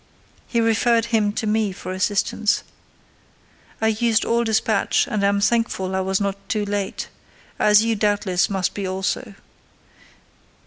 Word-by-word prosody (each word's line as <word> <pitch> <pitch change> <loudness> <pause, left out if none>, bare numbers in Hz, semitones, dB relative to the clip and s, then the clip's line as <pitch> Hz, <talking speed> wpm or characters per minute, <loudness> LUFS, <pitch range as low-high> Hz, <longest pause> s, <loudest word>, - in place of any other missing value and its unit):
He 235 - 0
referred 230 0 +2
him 210 -2 +3
to 220 - -3
me 215 -1 +1
for 185 0 -7
assistance. 205 +3 0 1.2
I 220 - +2
used 225 +1 +1
all 235 0 +1
despatch, 220 -2 +1
and 210 -3 -2
am 200 0 +2
thankful 200 -3 0
I - - +1
was 190 0 0
not 200 -1 -4
too 210 -1 0
late: 200 -1 -3 0.5
as 210 0 +5
you, 230 -1 +1
doubtless, 205 -3 +1
must 190 -2 -1
be 200 -2 -4
also. 190 +3 -3
210 Hz, 140 wpm, -22 LUFS, 195-225 Hz, 1.2 s, as